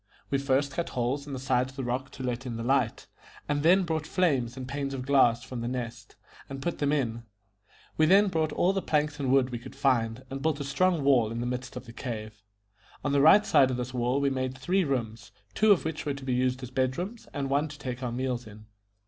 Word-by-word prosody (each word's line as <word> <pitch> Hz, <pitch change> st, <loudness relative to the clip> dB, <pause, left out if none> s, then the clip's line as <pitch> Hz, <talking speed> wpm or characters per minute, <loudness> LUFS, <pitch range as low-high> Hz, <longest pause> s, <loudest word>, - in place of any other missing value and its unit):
We 140 Hz, -, +2 dB
first 140 Hz, 0 st, +1 dB
cut 170 Hz, +4 st, -3 dB
holes 130 Hz, +4 st, -2 dB
in 140 Hz, -, -6 dB
the -, -, -3 dB
sides 130 Hz, 0 st, 0 dB
of -, -, -20 dB
the 135 Hz, -, -4 dB
rock 125 Hz, +3 st, -2 dB
to 130 Hz, -, -7 dB
let 125 Hz, +1 st, -3 dB
in 115 Hz, -2 st, -4 dB
the 115 Hz, -, -4 dB
light, 125 Hz, -2 st, +1 dB, 0.4 s
and 145 Hz, 0 st, 0 dB
then 180 Hz, +5 st, +5 dB
brought 160 Hz, -3 st, -2 dB
frames 135 Hz, -10 st, +1 dB
and 130 Hz, -1 st, -6 dB
panes 140 Hz, 0 st, -3 dB
of 130 Hz, -1 st, -5 dB
glass 125 Hz, -4 st, +4 dB
from 125 Hz, -2 st, -6 dB
The 120 Hz, -, -3 dB
Nest, 120 Hz, -2 st, -5 dB, 0.3 s
and 135 Hz, 0 st, -6 dB
put 170 Hz, +5 st, -3 dB
them 145 Hz, -1 st, +1 dB
in. 120 Hz, -6 st, -1 dB, 0.8 s
We 155 Hz, -, +4 dB
then 200 Hz, +4 st, +6 dB
brought 160 Hz, -3 st, 0 dB
all 185 Hz, +5 st, +2 dB
the 195 Hz, -, -1 dB
planks 150 Hz, -2 st, 0 dB
and 135 Hz, -2 st, 0 dB
wood 130 Hz, -1 st, +3 dB
we 120 Hz, -, -4 dB
could -, -, -11 dB
find, 130 Hz, -3 st, +1 dB
and 135 Hz, 0 st, -4 dB
built 155 Hz, -1 st, 0 dB
a -, -, -2 dB
strong 160 Hz, +3 st, +1 dB
wall 125 Hz, -6 st, +4 dB
in 115 Hz, -, -4 dB
the 120 Hz, -, -2 dB
midst 125 Hz, +1 st, -4 dB
of -, -, -7 dB
the 115 Hz, -, -11 dB
cave. 110 Hz, -4 st, -6 dB, 0.6 s
On 145 Hz, -, +1 dB
the 140 Hz, 0 st, +3 dB
right 205 Hz, +8 st, +7 dB
side 135 Hz, -2 st, +5 dB
of 125 Hz, -, -2 dB
this 125 Hz, +1 st, -4 dB
wall 125 Hz, +2 st, +1 dB
we 140 Hz, -1 st, +1 dB
made 130 Hz, 0 st, -2 dB
three 180 Hz, +9 st, +1 dB
rooms, 115 Hz, -6 st, -3 dB, 0.2 s
two 215 Hz, 0 st, +4 dB
of 190 Hz, -, +4 dB
which 160 Hz, -1 st, -3 dB
were 145 Hz, -2 st, -2 dB
to 140 Hz, -1 st, -9 dB
be 130 Hz, -, 0 dB
used 130 Hz, +1 st, 0 dB
as 125 Hz, -, -7 dB
bed 130 Hz, 0 st, 0 dB
rooms, 205 Hz, +6 st, -5 dB
and 140 Hz, -2 st, -3 dB
one 140 Hz, +3 st, +1 dB
to 145 Hz, -1 st, -10 dB
take 130 Hz, -3 st, -5 dB
our 125 Hz, -2 st, -2 dB
meals 125 Hz, -1 st, -2 dB
in. 105 Hz, 0 st, -13 dB
135 Hz, 250 wpm, -28 LUFS, 125-145 Hz, 0.8 s, right